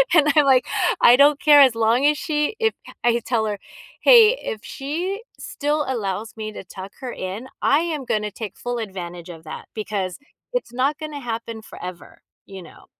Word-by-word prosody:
And 300 -3 +5
I'm, 300 -2 +5
like, 260 -2 +4 0.3
"I 240 - +8
don't 285 +1 +5
care 295 -1 +7
as 260 -4 +6
long 230 +4 +2
as 300 0 +4
she 300 +5 -1
if" 445 -1 +2 0.3
I 240 - +4
had - - 0
to - - -5
tell 230 -1 0
her, 205 -2 -3 0.4
"Hey, 475 0 +7
if 215 - -5
she 345 - -4 0.2
still 295 +1 -2
allows 220 -3 -3
me 215 -1 -5
to - - -8
tuck 190 +1 -10
her 255 -2 -5
in, 195 +7 -6
I 285 - +4
am 315 -5 -3
gonna 210 -2 -1
take 210 -1 -7
full 245 0 -4
advantage 180 -5 -7
of 165 -2 -10
that 155 - -8
because 200 -4 -3 0.4
it's - - -3
not 270 +4 0
gonna 305 -2 -6
happen 230 -2 -5
forever," 180 -4 -10 0.2
you 195 -1 -10
know. - - -16
240 Hz, 195 wpm, -22 LUFS, 210-295 Hz, 0.4 s, I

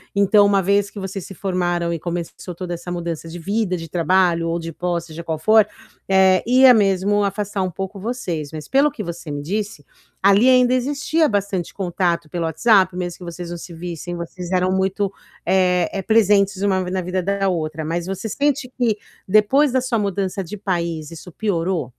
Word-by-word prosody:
Então 200 +1 +5
uma 200 -1 +3
vez 200 +2 +2
que - - -15
vocês 190 -1 -5
se - - -9
formaram 175 -3 -1
e 165 - -2
começou 175 +1 -5
toda 175 0 -5
essa 175 +1 -7
mudança 170 -2 -4
de 165 +2 -7
vida, 200 +1 -1
de 165 -2 -7
trabalho 175 0 +2
ou 165 0 -1
de 165 -1 -6
posse, 170 +1 -3
seja 160 +1 -8
qual 160 -1 -2
for, 215 +5 +4 0.4
eh, 190 -1 +4
ia 255 +1 +7
mesmo 205 -1 +2
afastar 200 0 -2
um 185 -1 -1
pouco 195 +3 -6
vocês, 185 - -4
mas 155 -1 -7
pelo 275 +2 +4
que 220 -7 -7
você 170 -2 -7
me 145 0 -4
disse, 200 +1 -4 0.4
ali 200 +5 +5
ainda 250 -1 +5
existia 290 +5 +1
bastante 200 - -2
contato 175 -3 -1
pelo 170 +1 -2
WhatsApp, 185 +2 +3
mesmo 175 -1 -4
que 180 - -10
vocês 170 0 -7
não 175 - -5
se 170 +1 -10
vissem, 175 +1 -6
vocês 170 +1 -7
eram 185 0 +2
muito, 190 +1 0 0.3
eh 180 -2 +2
eh, 195 - -3
presentes 200 -2 +3
uma 190 -2 +2
v 180 - -4
na 185 0 -1
vida 185 +1 -2
da 195 +1 0
outra, 160 -3 -3
mas 170 +2 -2
você 195 +4 -4
sente 280 0 0
que, 235 -4 +2 0.3
depois 230 +8 +4
da 260 - +2
sua 245 -3 -1
mudança 200 -1 -2
de 180 +5 -7
país, 170 -6 -3
isso 165 +2 -10
piorou? 175 - -1
185 Hz, 195 wpm, -21 LUFS, 170-205 Hz, 0.4 s, ia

